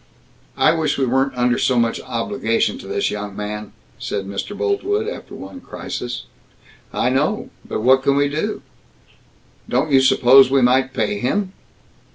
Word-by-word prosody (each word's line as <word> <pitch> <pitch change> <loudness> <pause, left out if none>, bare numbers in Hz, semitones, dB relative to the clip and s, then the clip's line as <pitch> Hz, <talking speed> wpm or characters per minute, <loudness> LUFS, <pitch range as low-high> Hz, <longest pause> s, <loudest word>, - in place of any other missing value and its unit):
"I - - +4
wish 160 -3 0
we 135 - +1
weren't 135 +1 0
under 125 0 +2
so 130 - +2
much 115 -1 +1
obligation - - -1
to - - -10
this - - -1
young 105 -1 -5
man," 105 0 -5 0.3
said 95 - -3
Mr. 100 - -5
Boltwood, 410 +1 0
after 470 - -7
one 270 - -9
crisis. 125 - -6 0.7
"I - - 0
know - - 0
but - - -4
what 130 +3 +5
can 140 +1 +2
we 145 0 +3
do?" 150 +2 -3 1.1
"Don't 135 +5 0
you 135 -1 +6
suppose 130 0 +6
we 135 -1 +3
might 130 +1 +3
pay 105 -4 -1
him?" 185 - -1
130 Hz, 160 wpm, -20 LUFS, 120-145 Hz, 1.1 s, you